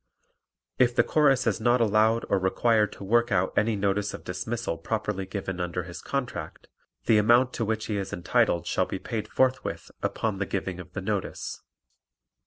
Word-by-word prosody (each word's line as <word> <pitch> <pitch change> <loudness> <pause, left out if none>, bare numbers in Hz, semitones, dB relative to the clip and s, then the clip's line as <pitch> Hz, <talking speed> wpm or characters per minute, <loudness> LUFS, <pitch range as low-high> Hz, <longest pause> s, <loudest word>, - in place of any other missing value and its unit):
If 120 -1 +4
the - - +5
Chorus 140 -4 +3
is 110 -2 0
not 120 +2 +3
allowed 110 +1 +3
or 100 - +2
required 105 +3 +2
to - - -10
work 120 +4 +2
out 95 -1 +1
any 110 +1 +2
notice 100 +1 0
of - - -11
dismissal 110 -1 -3
properly 105 0 -2
given 95 -1 -4
under 90 0 -2
his 90 0 -9
contract 140 -3 -4 0.4
the 110 -2 +5
amount 120 +4 +4
to 115 - -1
which 110 0 -1
he 105 - -2
is 100 -1 -4
entitled 85 0 +1
shall 90 +1 0
be - - -3
paid 110 +3 -4
forthwith 130 0 0
upon 105 -4 -1
the 95 - -1
giving 95 -2 -3
of 90 - -10
the 95 - -4
notice. 100 0 -3
105 Hz, 180 wpm, -27 LUFS, 95-115 Hz, 0.4 s, the